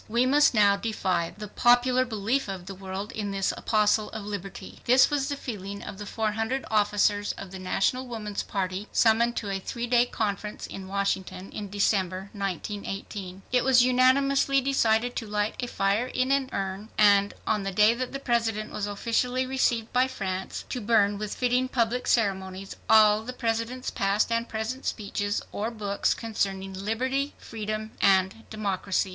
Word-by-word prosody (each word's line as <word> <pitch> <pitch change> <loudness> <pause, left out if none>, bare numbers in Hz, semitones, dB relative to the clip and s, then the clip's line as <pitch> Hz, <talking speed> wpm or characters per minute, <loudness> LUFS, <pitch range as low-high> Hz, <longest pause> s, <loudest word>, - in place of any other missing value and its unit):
We 235 +3 +2
must 285 0 +4
now 200 -1 +5
defy 185 -6 -1
the 210 0 -6
popular 245 +4 +3
belief 230 +3 -1
of 190 -2 -6
the 195 - -7
world 195 +2 -6
in 210 -2 -3
this 195 -1 0
apostle 215 -1 +2
of 215 -2 -7
liberty. 200 -2 -7
This 255 +4 +5
was 285 -1 0
the 285 - -1
feeling 200 -6 -6
of 195 - -8
the 205 - -6
four 220 0 -1
hundred 225 +5 -2
officers 205 -1 +2
of 195 - -9
the 190 - -7
National 195 +7 0
Woman's 215 -4 -4
Party, 190 +1 -3
summoned 235 +1 +3
to 205 -3 -3
a 195 - -2
three 235 +5 -4
days' 240 0 +3
conference 210 -1 -3
in 190 -1 -8
Washington 195 -1 -2
in 205 -1 -6
December, 195 -1 0
1918. 195 -1 -5
It 250 -1 +3
was 255 -2 +5
unanimously 270 +2 +3
decided 245 -3 +1
to 225 - -4
light 210 0 -1
a 245 - -2
fire 200 +2 0
in 255 +1 0
an 275 -1 +1
urn, 195 +2 -4
and, 205 -1 +5
on 210 -1 +1
the 195 - -2
day 210 +4 +5
that 255 +1 -4
the 275 - -3
President 225 -4 0
was 205 - -2
officially 245 +5 0
received 245 -4 0
by 250 +1 +4
France, 190 -6 -4
to 250 - -3
burn 205 -2 +3
with 210 -1 -4
fitting 250 +1 +1
public 245 -1 0
ceremonies 195 -3 0
all 215 -1 +6
the 250 +3 -6
President's 235 +1 -2
past 200 +3 +1
and 230 +1 0
present 225 +4 -4
speeches 205 -1 -2
or 215 +3 -2
books 205 -3 -1
concerning 195 -4 -3
"liberty", 255 +8 -2
"freedom" 215 -1 -5
and 190 +3 +2
"democracy." 200 -2 -1
215 Hz, 170 wpm, -27 LUFS, 200-245 Hz, -, all